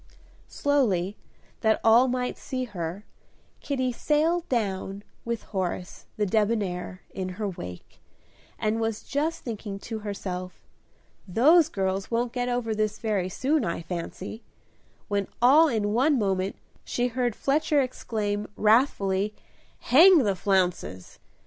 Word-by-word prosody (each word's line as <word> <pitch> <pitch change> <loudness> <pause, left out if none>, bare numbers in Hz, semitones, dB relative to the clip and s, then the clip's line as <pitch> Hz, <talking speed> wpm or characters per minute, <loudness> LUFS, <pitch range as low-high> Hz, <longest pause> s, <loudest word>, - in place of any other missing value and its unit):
Slowly, 210 -10 +1 0.4
that 220 0 +2
all 230 +3 +6
might 250 0 -1
see 255 -1 -4
her, 190 -3 -5 0.5
Kitty 260 -3 -1
sailed 320 +7 +1
down, 200 -4 -2 0.2
with 235 -1 -3
Horace, 185 -2 -4
the 210 - +1
debonair, 200 -3 -1
in 185 -1 -4
her 215 -1 -2
wake, 90 - -8 0.6
and 220 +1 0
was 225 -1 -2
just 310 +4 -2
thinking 210 -4 -5
to 225 -1 -5
herself, 185 -3 -6 0.6
"Those 300 - +5
girls 190 -4 -2
won't 235 +1 -1
get 245 0 -1
over 245 -2 -1
this 215 0 -1
very 205 -5 -1
soon, 280 +8 +1
I 170 -2 -2
fancy," 180 +5 -6 0.7
when 200 -2 -1
all 285 +7 +7
in 210 -6 0
one 275 +5 +3
moment 195 -3 0 0.3
she 245 0 -1
heard 245 -2 -1
Fletcher 295 +1 +1
exclaim, 215 -5 -2
wrathfully, 210 -3 +2 0.5
"Hang 330 +3 +7
the 200 -3 +1
flounces!" 180 - -1
215 Hz, 125 wpm, -26 LUFS, 195-250 Hz, 0.7 s, all